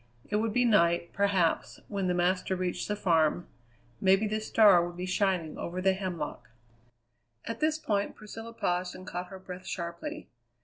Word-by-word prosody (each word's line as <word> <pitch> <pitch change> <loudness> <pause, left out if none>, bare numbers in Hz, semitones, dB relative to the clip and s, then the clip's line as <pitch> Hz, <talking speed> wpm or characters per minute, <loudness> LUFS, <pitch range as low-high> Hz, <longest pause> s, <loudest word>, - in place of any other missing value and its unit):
It 210 - +2
would 220 +1 0
be 245 +3 +2
night, 170 -6 +3
perhaps, 195 -5 +1
when 195 -3 -2
the 180 - +1
master 180 +1 +1
reached 180 -1 -2
the 210 - -1
farm; 170 -3 +2 0.5
maybe 195 +2 +4
the 215 +1 -1
star 205 -5 +6
would 175 0 -6
be 180 - -3
shining 185 -4 0
over 175 +2 -4
the 190 +1 +3
hemlock 180 - -5 1.0
At 230 0 -4
this 310 0 +2
point 205 -9 -1
Priscilla 225 +2 -9
paused 180 -4 -1
and 185 - -10
caught 180 +1 -5
her 190 - -9
breath 185 0 -9
sharply. 180 - -5
185 Hz, 170 wpm, -29 LUFS, 175-210 Hz, 1.0 s, star